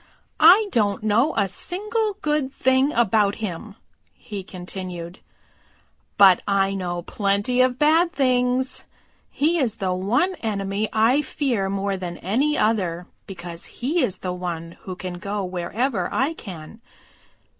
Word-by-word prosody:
"I 410 Hz, +5 st, +7 dB
don't 205 Hz, -3 st, +1 dB
know 225 Hz, +8 st, +2 dB
a 200 Hz, -2 st, +2 dB
single 415 Hz, -, -1 dB
good 300 Hz, -3 st, 0 dB
thing 260 Hz, +1 st, +2 dB
about 215 Hz, -5 st, +2 dB
him," 210 Hz, 0 st, -6 dB, 0.4 s
he 205 Hz, -4 st, -7 dB
continued, 180 Hz, -1 st, -7 dB, 1.0 s
"but 195 Hz, -3 st, +7 dB
I 195 Hz, -1 st, +2 dB
know 175 Hz, -2 st, -3 dB
plenty 205 Hz, +6 st, 0 dB
of 255 Hz, -1 st, +2 dB
bad 320 Hz, +4 st, +4 dB
things. 255 Hz, -3 st, +1 dB, 0.4 s
He 330 Hz, +4 st, +1 dB
is 235 Hz, -6 st, 0 dB
the 190 Hz, -4 st, -1 dB
one 240 Hz, -, +1 dB
enemy 200 Hz, -1 st, -2 dB
I 230 Hz, +6 st, +3 dB
fear 240 Hz, -11 st, -1 dB
more 195 Hz, 0 st, -1 dB
than 175 Hz, -2 st, -6 dB
any 270 Hz, -, 0 dB
other 180 Hz, -6 st, 0 dB, 0.2 s
because 175 Hz, -3 st, -7 dB
he 300 Hz, +8 st, -1 dB
is 190 Hz, -, -1 dB
the 180 Hz, -1 st, -4 dB
one 170 Hz, -2 st, -5 dB
who 185 Hz, -, -7 dB
can 180 Hz, -1 st, -6 dB
go 200 Hz, +1 st, -3 dB
wherever 185 Hz, +4 st, -2 dB
I 275 Hz, +5 st, 0 dB
can. 190 Hz, -, -10 dB
205 Hz, 135 wpm, -23 LUFS, 185-260 Hz, 1.0 s, I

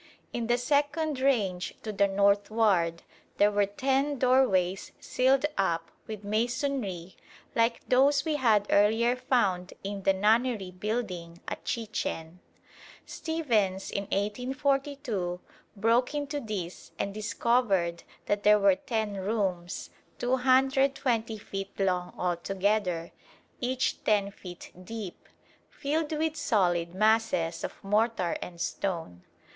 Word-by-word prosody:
In 235 Hz, -1 st, -2 dB
the 240 Hz, 0 st, +3 dB
second 290 Hz, +3 st, 0 dB
range 205 Hz, -10 st, +1 dB
to 215 Hz, -, -3 dB
the 200 Hz, -1 st, +3 dB
northward 200 Hz, -3 st, +2 dB, 0.3 s
there 205 Hz, +1 st, +5 dB
were 205 Hz, -1 st, +2 dB
ten 270 Hz, +6 st, 0 dB
doorways 220 Hz, -8 st, +2 dB
sealed 265 Hz, +2 st, +2 dB
up 165 Hz, -3 st, 0 dB, 0.2 s
with 215 Hz, -2 st, -6 dB
masonry 215 Hz, -, -2 dB, 0.4 s
like 230 Hz, 0 st, +1 dB
those 275 Hz, +3 st, +4 dB
we 310 Hz, -2 st, 0 dB
had 220 Hz, -6 st, +3 dB
earlier 225 Hz, +4 st, +4 dB
found 195 Hz, -8 st, 0 dB
in 200 Hz, 0 st, -4 dB
the 195 Hz, -, +4 dB
Nunnery 215 Hz, 0 st, +2 dB
building 185 Hz, -4 st, -4 dB
at -, -, -6 dB
Chichen. 180 Hz, -7 st, -3 dB, 0.7 s
Stephens 225 Hz, -, -1 dB
in 200 Hz, -, -2 dB
1842 250 Hz, -2 st, -1 dB, 0.4 s
broke 230 Hz, +6 st, +2 dB
into 290 Hz, 0 st, -2 dB
these 200 Hz, -8 st, -6 dB
and 200 Hz, -, -2 dB
discovered 215 Hz, -5 st, +1 dB, 0.2 s
that 205 Hz, 0 st, 0 dB
there 210 Hz, 0 st, +6 dB
were 200 Hz, -2 st, +4 dB
ten 215 Hz, -1 st, -2 dB
rooms, 190 Hz, -3 st, -2 dB, 0.3 s
220 260 Hz, -2 st, +2 dB
feet 195 Hz, -1 st, -7 dB
long 180 Hz, -2 st, 0 dB
altogether, 180 Hz, 0 st, 0 dB, 0.5 s
each 255 Hz, +1 st, -1 dB
10 200 Hz, -2 st, +2 dB
feet 180 Hz, -3 st, -10 dB
deep, 210 Hz, -2 st, -8 dB, 0.4 s
filled 305 Hz, +2 st, -2 dB
with 315 Hz, 0 st, 0 dB
solid 175 Hz, -, +1 dB
masses 215 Hz, -6 st, +2 dB
of -, -, -4 dB
mortar 210 Hz, -3 st, +1 dB
and 175 Hz, -1 st, -8 dB
stone. 165 Hz, -, -3 dB
210 Hz, 115 wpm, -28 LUFS, 190-255 Hz, 0.7 s, there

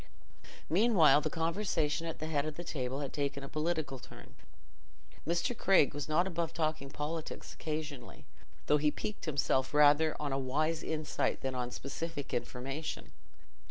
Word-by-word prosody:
Meanwhile 165 Hz, -, +5 dB
the 155 Hz, -, -1 dB
conversation 165 Hz, -1 st, 0 dB
at 165 Hz, -, -4 dB
the 155 Hz, -, -4 dB
head 155 Hz, -2 st, 0 dB
of 155 Hz, -, -4 dB
the 175 Hz, -, -6 dB
table 135 Hz, -4 st, -3 dB
had 140 Hz, -, -4 dB
taken 140 Hz, -1 st, -2 dB
a -, -, -5 dB
political 155 Hz, -3 st, -2 dB
turn. -, -, -13 dB, 0.9 s
Mr. 175 Hz, +9 st, +1 dB
Craig 190 Hz, -9 st, +4 dB
was 145 Hz, +1 st, -4 dB
not 165 Hz, +4 st, +3 dB
above 170 Hz, -3 st, -2 dB
talking 155 Hz, -4 st, -1 dB
politics 155 Hz, +3 st, -5 dB
occasionally, 150 Hz, -5 st, -5 dB, 0.4 s
though 150 Hz, -, +4 dB
he 150 Hz, 0 st, +3 dB
piqued 205 Hz, +6 st, -5 dB
himself 135 Hz, -2 st, +1 dB
rather 150 Hz, +1 st, +6 dB
on 145 Hz, -2 st, -2 dB
a 135 Hz, -, 0 dB
wise 155 Hz, +5 st, 0 dB
insight 155 Hz, -1 st, -1 dB
than 130 Hz, 0 st, -2 dB
on 125 Hz, -1 st, -2 dB
specific 140 Hz, +3 st, -5 dB
information. 135 Hz, +5 st, -4 dB
155 Hz, 155 wpm, -33 LUFS, 140-165 Hz, 0.9 s, rather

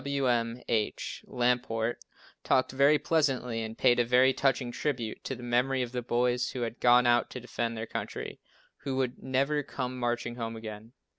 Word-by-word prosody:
Wm. 125 Hz, -4 st, 0 dB
H. 110 Hz, -2 st, -2 dB
Lamport 120 Hz, -2 st, 0 dB, 0.4 s
talked 130 Hz, -, +2 dB
very 140 Hz, +3 st, +5 dB
pleasantly 135 Hz, -6 st, 0 dB
and 110 Hz, 0 st, -6 dB
paid 120 Hz, -, +4 dB
a -, -, +5 dB
very 125 Hz, +2 st, +4 dB
touching 130 Hz, -2 st, +1 dB
tribute 120 Hz, -4 st, -3 dB
to -, -, -3 dB
the 125 Hz, -, -10 dB
memory 125 Hz, +2 st, +1 dB
of 120 Hz, -, -5 dB
the 125 Hz, -1 st, -2 dB
boys, 120 Hz, 0 st, 0 dB
who 125 Hz, -, -4 dB
had 115 Hz, 0 st, -3 dB
gone 125 Hz, 0 st, +5 dB
out 120 Hz, 0 st, +3 dB
to 125 Hz, -, -6 dB
defend 115 Hz, -1 st, -3 dB
their 110 Hz, -, -3 dB
country, -, -, -5 dB, 0.4 s
who 135 Hz, -2 st, -4 dB
would 130 Hz, -1 st, -1 dB
never 135 Hz, +3 st, +1 dB
come 130 Hz, -2 st, -5 dB
"marching 120 Hz, 0 st, -2 dB
home 115 Hz, -1 st, -4 dB
again." 110 Hz, +1 st, -8 dB
125 Hz, 175 wpm, -29 LUFS, 120-130 Hz, 0.4 s, very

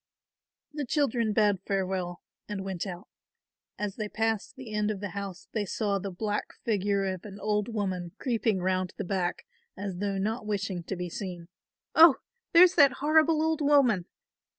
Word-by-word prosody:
The 295 Hz, -1 st, -3 dB
children 240 Hz, -6 st, +1 dB
bade 205 Hz, -2 st, +3 dB
farewell 185 Hz, -3 st, -2 dB, 0.3 s
and 195 Hz, -2 st, -4 dB
went 190 Hz, 0 st, -3 dB
out. 180 Hz, -2 st, -7 dB, 0.7 s
As 205 Hz, -2 st, -4 dB
they 215 Hz, -1 st, -3 dB
passed 220 Hz, +1 st, -1 dB
the 255 Hz, -5 st, -9 dB
end 210 Hz, 0 st, +1 dB
of 210 Hz, -2 st, -2 dB
the 205 Hz, 0 st, -4 dB
house 200 Hz, -2 st, -6 dB
they 215 Hz, -, -1 dB
saw 200 Hz, 0 st, -1 dB
the 195 Hz, -, -4 dB
black 205 Hz, +3 st, -3 dB
figure 200 Hz, -2 st, +1 dB
of 185 Hz, -2 st, -3 dB
an 205 Hz, -1 st, -9 dB
old 210 Hz, -1 st, 0 dB
woman 190 Hz, -6 st, -3 dB
creeping 225 Hz, -6 st, 0 dB
round 185 Hz, 0 st, 0 dB
the -, -, -2 dB
back 180 Hz, -2 st, -2 dB, 0.3 s
as 195 Hz, -3 st, -4 dB
though 200 Hz, +1 st, -1 dB
not 220 Hz, +5 st, -1 dB
wishing 200 Hz, -3 st, -2 dB
to 195 Hz, -, -3 dB
be 180 Hz, 0 st, -4 dB
seen. 175 Hz, -3 st, -6 dB, 0.4 s
"Oh, 320 Hz, -3 st, +9 dB, 0.4 s
there's 355 Hz, +1 st, +8 dB
that 280 Hz, -5 st, +6 dB
horrible 310 Hz, +2 st, +3 dB
old 320 Hz, -1 st, 0 dB
woman! 275 Hz, -11 st, +4 dB
205 Hz, 170 wpm, -28 LUFS, 190-230 Hz, 0.7 s, Oh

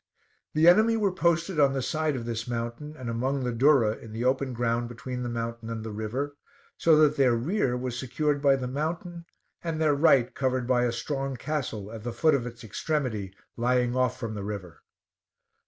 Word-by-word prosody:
The 155 Hz, +2 st, +5 dB
enemy 220 Hz, +6 st, +6 dB
were 205 Hz, -3 st, +2 dB
posted 170 Hz, -1 st, +1 dB
on 140 Hz, -2 st, +5 dB
the 135 Hz, -, -1 dB
side 155 Hz, +1 st, 0 dB
of 120 Hz, -3 st, -4 dB
this 115 Hz, 0 st, -3 dB
mountain 120 Hz, +6 st, -4 dB
and 130 Hz, -, -7 dB
among 130 Hz, +4 st, -1 dB
the 125 Hz, -, -1 dB
durra 120 Hz, -3 st, +4 dB
in 110 Hz, -2 st, -11 dB
the 115 Hz, +2 st, -3 dB
open 130 Hz, +1 st, +1 dB
ground 120 Hz, 0 st, -1 dB
between 125 Hz, +1 st, -6 dB
the 120 Hz, -, -3 dB
mountain 115 Hz, -1 st, -4 dB
and 115 Hz, -1 st, -4 dB
the 110 Hz, -, -5 dB
river; 120 Hz, +7 st, -3 dB, 0.4 s
so 165 Hz, -1 st, +4 dB
that 150 Hz, -1 st, +4 dB
their 130 Hz, -4 st, +4 dB
rear 130 Hz, -, 0 dB
was 125 Hz, -1 st, -4 dB
secured 145 Hz, +3 st, -1 dB
by 140 Hz, -1 st, +5 dB
the 130 Hz, -2 st, -3 dB
mountain, 170 Hz, +5 st, -4 dB, 0.4 s
and 165 Hz, -2 st, -2 dB
their 155 Hz, -2 st, +3 dB
right 140 Hz, -4 st, +4 dB
covered 130 Hz, -2 st, 0 dB
by 125 Hz, 0 st, +2 dB
a 120 Hz, -, +1 dB
strong 135 Hz, +3 st, -3 dB
castle 120 Hz, -7 st, -4 dB
at 115 Hz, -1 st, -7 dB
the 120 Hz, 0 st, -4 dB
foot 155 Hz, -1 st, +3 dB
of 125 Hz, -3 st, 0 dB
its 120 Hz, 0 st, -10 dB
extremity 110 Hz, -, -2 dB, 0.2 s
lying 125 Hz, 0 st, +1 dB
off 125 Hz, -1 st, +1 dB
from 115 Hz, -4 st, -4 dB
the 100 Hz, -2 st, -5 dB
river. 100 Hz, -6 st, -6 dB
125 Hz, 200 wpm, -27 LUFS, 115-150 Hz, 0.4 s, enemy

